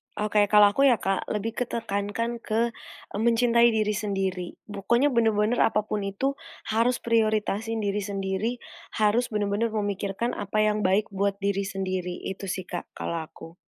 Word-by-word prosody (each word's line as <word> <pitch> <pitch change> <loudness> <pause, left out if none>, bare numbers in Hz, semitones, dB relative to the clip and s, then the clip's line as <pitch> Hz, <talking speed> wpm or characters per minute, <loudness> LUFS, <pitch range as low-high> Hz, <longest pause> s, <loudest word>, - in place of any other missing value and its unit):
Oke, 210 0 +2
kalau 205 0 +6
aku 275 +6 +4
ya, 250 - +6
Kak, 195 -3 -2
lebih 215 +2 -2
ke 250 - +1
tekankan 230 +2 -2
ke, 230 +1 0 0.4
eee, 205 - -4
mencintai 235 +1 +4
diri 215 -1 +1
sendiri, 195 -4 -2
pokoknya 235 +7 +1
bener-bener 225 -1 +2
apa 215 -1 +3
pun 215 0 -2
itu, 200 +8 -1 0.4
harus 230 +3 +2
prioritasin 220 -1 +1
diri 200 0 0
sendiri, 195 +2 -2 0.4
harus 220 +3 +2
bener-bener 210 +1 0
memikirkan 205 +1 -2
apa 210 +1 -1
yang 215 0 +1
baik 195 +3 +2
buat 200 0 0
diri 200 0 0
sendiri, 185 -2 -3
itu 195 +1 -5
sih, 185 +1 -3
Kak, 175 0 -6
kalau 170 - -3
aku. 165 +1 -11
210 Hz, 155 wpm, -26 LUFS, 195-225 Hz, 0.4 s, kalau